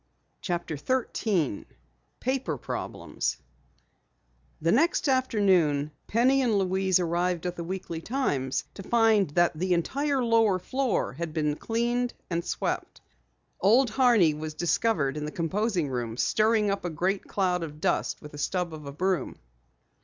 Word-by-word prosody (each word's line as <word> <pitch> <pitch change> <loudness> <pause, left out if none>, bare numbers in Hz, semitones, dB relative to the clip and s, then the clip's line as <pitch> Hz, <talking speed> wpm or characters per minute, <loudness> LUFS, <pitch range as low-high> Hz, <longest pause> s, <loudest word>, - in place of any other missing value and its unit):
CHAPTER 175 -4 -3
13 200 - -1 0.6
PAPER 255 - -1
PROBLEMS - - -4 1.2
The 165 +2 +1
next 325 - +2
afternoon 190 - +2 0.2
Penny 255 +5 +3
and 230 -5 +2
Louise 190 -1 +2
arrived 175 0 0
at 180 0 -2
the 170 - -5
Weekly 170 -2 -5
Times 145 - -1
to - - -8
find 220 -3 +3
that 175 0 +4
the 180 +3 0
entire 275 - 0
lower 225 -4 +3
floor 255 - -1
had 160 +2 -5
been 150 -2 +1
cleaned 240 +5 -1 0.2
and 170 0 0
swept. - - -3 0.6
Old 230 +5 +4
Horney 225 - +4
was 155 +1 -6
discovered 160 -4 +1
in 150 - -3
the 150 - -4
composing 180 +1 -1
room, 120 -3 -3
stirring 215 - +2
up 200 - -2
a 175 - -2
great 185 +5 -1
cloud 180 -3 0
of 150 -2 -6
dust - - -1
with 150 - -10
a 145 - -8
stub 180 +1 -1
of 150 -2 -8
a - - -5
broom. 180 0 -1
185 Hz, 145 wpm, -27 LUFS, 160-230 Hz, 1.2 s, that